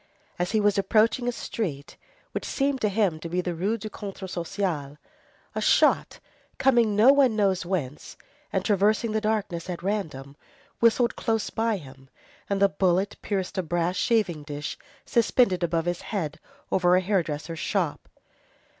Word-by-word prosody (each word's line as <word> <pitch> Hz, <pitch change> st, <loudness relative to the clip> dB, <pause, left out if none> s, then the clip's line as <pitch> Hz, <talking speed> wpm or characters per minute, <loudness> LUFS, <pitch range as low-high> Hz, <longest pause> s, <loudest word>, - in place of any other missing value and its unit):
As 175 Hz, 0 st, 0 dB
he 220 Hz, -, +2 dB
was 205 Hz, -1 st, +3 dB
approaching 225 Hz, +4 st, +2 dB
a -, -, +2 dB
street 165 Hz, -, -5 dB, 0.4 s
which -, -, -4 dB
seemed 275 Hz, -1 st, -1 dB
to 210 Hz, -, +2 dB
him 195 Hz, -6 st, +1 dB
to 170 Hz, -, -6 dB
be 180 Hz, +2 st, -1 dB
the 180 Hz, -1 st, -2 dB
Rue 195 Hz, +7 st, -1 dB
du 215 Hz, -, -7 dB
Contrat 195 Hz, -2 st, -7 dB
Social, 170 Hz, -5 st, -3 dB, 0.6 s
a -, -, -2 dB
shot -, -, +3 dB, 0.4 s
coming 240 Hz, -5 st, +3 dB
no 230 Hz, +7 st, +7 dB
one 265 Hz, -5 st, +4 dB
knows 190 Hz, -4 st, +1 dB
whence, 155 Hz, -7 st, -4 dB, 0.3 s
and -, -, -1 dB
traversing 215 Hz, +2 st, +2 dB
the 220 Hz, 0 st, 0 dB
darkness 205 Hz, -6 st, -2 dB
at 175 Hz, -1 st, -5 dB
random, 155 Hz, -9 st, -3 dB, 0.4 s
whistled 235 Hz, +1 st, +3 dB
close 225 Hz, -3 st, -1 dB
by 225 Hz, -1 st, 0 dB
him, 135 Hz, -4 st, -13 dB, 0.4 s
and 200 Hz, -1 st, 0 dB
the 200 Hz, -, +6 dB
bullet 190 Hz, 0 st, +1 dB
pierced 195 Hz, -1 st, -2 dB
a -, -, +3 dB
brass 175 Hz, +1 st, -1 dB
shaving 195 Hz, -9 st, +1 dB
dish 145 Hz, 0 st, -5 dB, 0.3 s
suspended 230 Hz, -5 st, +2 dB
above 170 Hz, -1 st, 0 dB
his 175 Hz, 0 st, -2 dB
head 170 Hz, -7 st, -4 dB, 0.3 s
over 180 Hz, -1 st, +4 dB
a 185 Hz, -, +3 dB
hairdresser's 165 Hz, -4 st, -2 dB
shop. 180 Hz, -8 st, -2 dB
190 Hz, 160 wpm, -26 LUFS, 170-215 Hz, 0.6 s, no